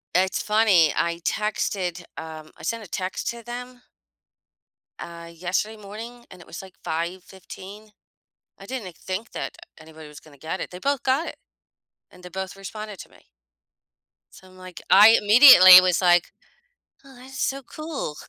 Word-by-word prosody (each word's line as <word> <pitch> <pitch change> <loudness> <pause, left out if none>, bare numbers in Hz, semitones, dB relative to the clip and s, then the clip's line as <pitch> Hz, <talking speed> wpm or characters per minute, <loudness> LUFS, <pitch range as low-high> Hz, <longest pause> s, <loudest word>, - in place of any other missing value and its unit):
It's 190 +1 +1
funny, 210 -7 +3
I 170 0 -2
texted, 190 -4 -2
um, 155 -1 -9
I - - -17
sent 230 -1 -4
a - - -12
text 185 +2 -4
to 235 0 -7
them 245 +1 -9 1.2
uh, 170 0 -10
yesterday 185 +6 -3
morning 225 +4 -11
and 185 - -14
it 175 - -15
was 170 - -9
like 190 -1 -15
5:15, 185 +4 -7 0.7
I 195 - -12
didn't 210 -9 -7
think 190 +4 -6
that - - -6 0.2
anybody 160 -1 -14
was 150 0 -13
gonna 145 -2 -19
get 160 +6 -6
it, - - -5
they 180 - -9
both 280 +4 -2
got 270 +6 0
it - - -8 0.7
and 180 - -18
they 180 - -10
both 190 +1 -7
responded 210 +1 -9
to - - -11
me - - -23 1.1
so 185 - -17
I'm 185 0 -19
like 185 -1 -12
I 210 +3 +8
immediately 210 -4 +9
was 185 -1 +1
like, 175 -2 +2 0.7
"Oh, 270 -2 -17
that's 260 +2 -12
so 275 +1 -2
cool." 305 - -7
190 Hz, 160 wpm, -23 LUFS, 175-225 Hz, 1.2 s, immediately